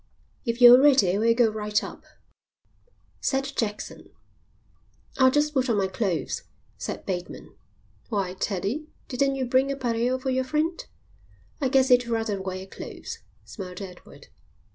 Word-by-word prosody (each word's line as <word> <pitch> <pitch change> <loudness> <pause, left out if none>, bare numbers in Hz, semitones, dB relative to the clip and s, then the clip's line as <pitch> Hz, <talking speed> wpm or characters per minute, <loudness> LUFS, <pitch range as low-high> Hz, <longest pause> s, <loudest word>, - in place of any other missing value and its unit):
"If 235 0 -2
you're 245 +1 +10
ready 225 -10 +4
we'll 230 +1 +3
go 230 -2 +4
right 210 -1 -1
up," - - -9 1.1
said 270 -1 0
Jackson. 210 -2 -4 1.1
"I'll 260 -1 +7
just 295 +2 +1
put 260 -2 +1
on 225 - +2
my 195 - +2
clothes," 190 -3 -2 0.3
said - - -6
Bateman. 180 -2 -5 0.6
"Why, 195 -5 -1
Teddie, 205 - -3 0.2
didn't 275 0 0
you 265 -1 -1
bring 260 +3 +2
a - - -2
pareo 245 -1 0
for 260 0 -2
your 260 0 +1
friend?" 305 +6 -1 0.8
"I 265 - +1
guess 265 0 +3
he'd 245 -1 +5
rather 225 -4 -1
wear 190 0 -5
clothes," 455 - -8 0.3
smiled 180 -4 -8
Edward. 180 -7 -11
235 Hz, 140 wpm, -26 LUFS, 200-265 Hz, 1.1 s, you're